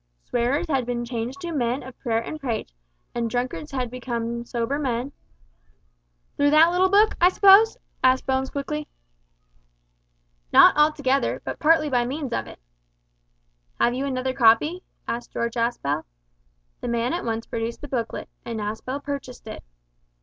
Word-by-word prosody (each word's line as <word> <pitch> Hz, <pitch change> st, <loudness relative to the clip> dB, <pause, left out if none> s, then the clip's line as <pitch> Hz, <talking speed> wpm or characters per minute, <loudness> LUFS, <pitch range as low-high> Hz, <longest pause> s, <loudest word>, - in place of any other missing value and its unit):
Swearers 250 Hz, +8 st, 0 dB
had 270 Hz, -5 st, +1 dB
been 240 Hz, -1 st, -2 dB
changed 240 Hz, +6 st, -4 dB
to 345 Hz, -1 st, -4 dB
men 250 Hz, -3 st, -1 dB
of 255 Hz, 0 st, -10 dB
prayer 230 Hz, -3 st, 0 dB
and 310 Hz, -, -6 dB
praise, 235 Hz, -, -4 dB, 0.4 s
and 235 Hz, -1 st, -1 dB
drunkards 250 Hz, +5 st, -3 dB
had 255 Hz, -3 st, -3 dB
become 235 Hz, -2 st, -4 dB
sober 240 Hz, +4 st, -2 dB
men 255 Hz, -1 st, -2 dB, 1.2 s
"Through 285 Hz, -, +3 dB
that 315 Hz, +3 st, +6 dB
little 370 Hz, +1 st, +3 dB
book, 415 Hz, +3 st, +4 dB
I 355 Hz, -, +7 dB
suppose?" 400 Hz, +4 st, +6 dB, 0.3 s
asked 260 Hz, 0 st, +4 dB
Bones 265 Hz, 0 st, 0 dB
quickly. 300 Hz, +1 st, -4 dB, 1.6 s
"Not -, -, +8 dB
altogether, 290 Hz, -3 st, +2 dB
but -, -, -5 dB
partly 310 Hz, 0 st, +4 dB
by 245 Hz, -4 st, +1 dB
means 275 Hz, -1 st, -4 dB
of -, -, -2 dB
it." -, -, -12 dB, 1.2 s
"Have 240 Hz, -, +3 dB
you 265 Hz, +3 st, -2 dB
another 260 Hz, -1 st, -2 dB
copy?" 265 Hz, +9 st, +4 dB, 0.3 s
asked 240 Hz, +1 st, -4 dB
George 235 Hz, 0 st, -2 dB
Aspel. 230 Hz, -, -1 dB, 0.8 s
The -, -, -5 dB
man 235 Hz, +2 st, 0 dB
at 350 Hz, -, -2 dB
once 225 Hz, 0 st, -2 dB
produced 230 Hz, 0 st, -4 dB
the 290 Hz, -, -7 dB
booklet, 240 Hz, -5 st, -3 dB, 0.2 s
and 230 Hz, -2 st, -5 dB
Aspel 220 Hz, +7 st, -4 dB
purchased 280 Hz, -4 st, -6 dB
it. 220 Hz, -, -8 dB
255 Hz, 150 wpm, -24 LUFS, 235-295 Hz, 1.6 s, Not